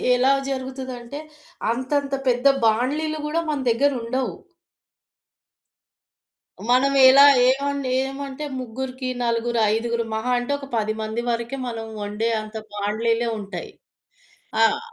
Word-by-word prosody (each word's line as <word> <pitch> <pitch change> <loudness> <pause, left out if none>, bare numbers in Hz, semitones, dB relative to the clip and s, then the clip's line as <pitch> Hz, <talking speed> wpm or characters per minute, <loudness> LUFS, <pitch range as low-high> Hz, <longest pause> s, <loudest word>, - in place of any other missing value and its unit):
ఎలా 260 +2 +4 0.2
జరుగుతదంటే, 260 0 -5 0.5
అంతంత 275 +3 -1 0.2
పెద్ద 245 +2 0 0.2
బాండీలు 290 +8 +1
గూడా 315 +3 0
మన 295 - -1
దెగ్గరుండవు. 255 0 0 2.4
మనం 260 +3 +4 0.2
ఎలా, 275 +2 +8 0.2
ఏమండి, 280 0 0 0.2
ఏమంటే, 275 +2 -6
ముగ్గురికి, 255 +1 -5
నలుగురు, 235 0 0
ఐదుగురు, 235 +1 -1
మహా 220 +3 -1
అంటే, 245 +3 -4
ఒక 275 - -8
10 215 0 0
మంది 220 +2 -3
వరకే, 235 +3 -2
మనం 225 -2 -5 0.2
వండే 210 +3 -1
అంత 215 +1 -11 0.2
బాండీలే 225 +3 0
ఉంటాయి. 200 0 -7 0.9
ఆహ్, 225 - +4
250 Hz, 110 wpm, -23 LUFS, 230-275 Hz, 2.4 s, ఎలా